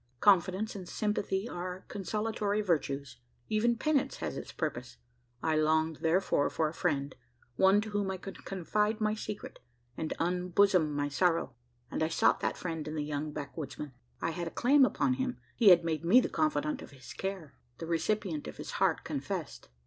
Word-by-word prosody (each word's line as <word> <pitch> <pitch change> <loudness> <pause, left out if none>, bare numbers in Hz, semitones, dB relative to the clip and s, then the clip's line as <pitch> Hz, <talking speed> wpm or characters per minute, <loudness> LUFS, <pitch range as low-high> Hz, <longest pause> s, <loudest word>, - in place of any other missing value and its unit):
Confidence 195 - +3
and 185 -3 -7
sympathy 210 -1 -1
are 180 -2 -5
consolatory 210 +1 -1
virtues 140 -7 -1 0.3
even 225 +2 +2
penance 280 -2 +1
has - - -4
its - - -6
purpose. 125 -6 -4 0.5
I 160 -1 +2
longed, 155 0 +2
therefore, 165 -3 +2
for 160 - 0
a 155 - -5
friend 145 -6 -1 0.4
one 190 +6 +5
to 215 0 -6
whom 205 -1 0
I 190 - -2
could 195 +1 -9
confide 210 +4 0
my 215 -1 +1
secret, 215 -1 -6 0.4
and 160 - -3
unbosom 180 -1 +2
my 145 0 0
sorrow; 165 -2 +1 0.4
and - - -2
I 160 - +3
sought 165 - +3
that - - -1
friend 165 -3 -4
in 155 - -4
the 150 - -1
young 150 +1 -3
backwoodsman. 145 0 -6 0.3
I 165 - -1
had 170 +1 -4
a - - -2
claim 270 - +5
upon 140 - +1
him: 130 -1 -2 0.2
he 220 - +6
had 170 -2 +7
made 160 -1 -1
me 190 +9 +7
the - - 0
confidant 305 -2 0
of - - -10
his 135 -2 -11
care 190 -7 -5 0.2
the 165 - -6
recipient 170 -1 -1
of - - -8
his - - -6
heart - - +3
confessed. - - -4
180 Hz, 180 wpm, -31 LUFS, 155-210 Hz, 0.5 s, had